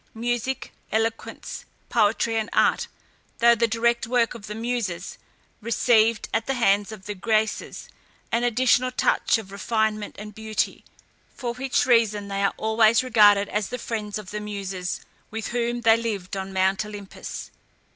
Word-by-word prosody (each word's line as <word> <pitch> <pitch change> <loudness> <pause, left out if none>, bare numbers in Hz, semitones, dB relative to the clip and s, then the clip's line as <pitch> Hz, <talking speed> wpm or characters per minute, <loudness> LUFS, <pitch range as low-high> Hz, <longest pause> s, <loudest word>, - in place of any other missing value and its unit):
Music, 240 +2 -2 0.2
eloquence, 225 +1 -2 0.3
poetry, 225 +2 +2
and 220 0 -1
art, - - +3 0.5
though 235 0 +6
the 235 0 +2
direct 235 +1 +1
work 235 -1 +2
of 225 -4 -10
the 210 - -5
Muses, 225 -6 -3 0.4
received 230 -1 +3
at 225 0 0
the 270 - 0
hands 205 -3 +2
of 205 -3 -10
the 210 - -4
Graces 215 +2 -1 0.4
an 235 - +1
additional 245 +1 +3
touch 250 - +2
of 205 -4 -9
refinement 215 +1 -1
and 210 +1 -8
beauty; 220 0 -2 0.5
for 240 -2 -3
which 260 +1 0
reason 215 -5 +2
they 195 0 -2
are 200 - +1
always 220 +1 +4
regarded 205 -5 +5
as 210 -1 -1
the 250 - -4
friends 215 -3 -4
of 210 -3 -8
the 210 - -3
Muses, 195 -3 -4 0.3
with 220 0 -4
whom 240 0 -1
they 225 -1 +6
lived 205 -5 -3
on 190 0 -4
Mount 190 +1 +1
Olympus. 205 -2 -8
220 Hz, 155 wpm, -24 LUFS, 205-235 Hz, 0.5 s, though